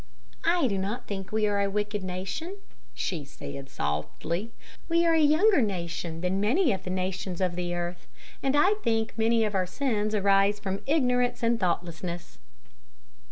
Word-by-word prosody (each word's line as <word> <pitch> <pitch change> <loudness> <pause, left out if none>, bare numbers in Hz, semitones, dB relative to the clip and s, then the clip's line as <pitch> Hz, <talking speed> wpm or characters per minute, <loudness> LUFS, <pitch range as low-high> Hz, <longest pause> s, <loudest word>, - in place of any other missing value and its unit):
"I 340 -3 +4
do 200 -6 0
not 205 +6 -3
think 195 -2 -5
we 215 0 +2
are 205 -1 +1
a 200 - +1
wicked 210 0 -2
nation," 190 - -4 0.4
she 165 -6 -2
said, 140 -1 -8
softly. 135 - -3 0.4
"We 335 +1 +3
are 335 - +4
a 325 - +4
younger 315 +5 +5
nation 170 -5 -3
than 185 +2 0
many 275 - +3
of 190 -1 -5
the - - -4
nations 185 -1 -2
of 180 -2 0
the 175 0 -2
earth, 175 0 -4 0.3
and 270 +1 +1
I 375 +8 +5
think 225 -1 +1
that - - -12
many 225 0 +3
of 210 - -2
our 185 -2 +1
sins 215 -1 0
arise 200 0 +3
from 195 -1 -3
ignorance 250 -5 +2
and 230 0 +2
thoughtlessness." 175 -1 -3
200 Hz, 170 wpm, -28 LUFS, 180-235 Hz, 0.4 s, younger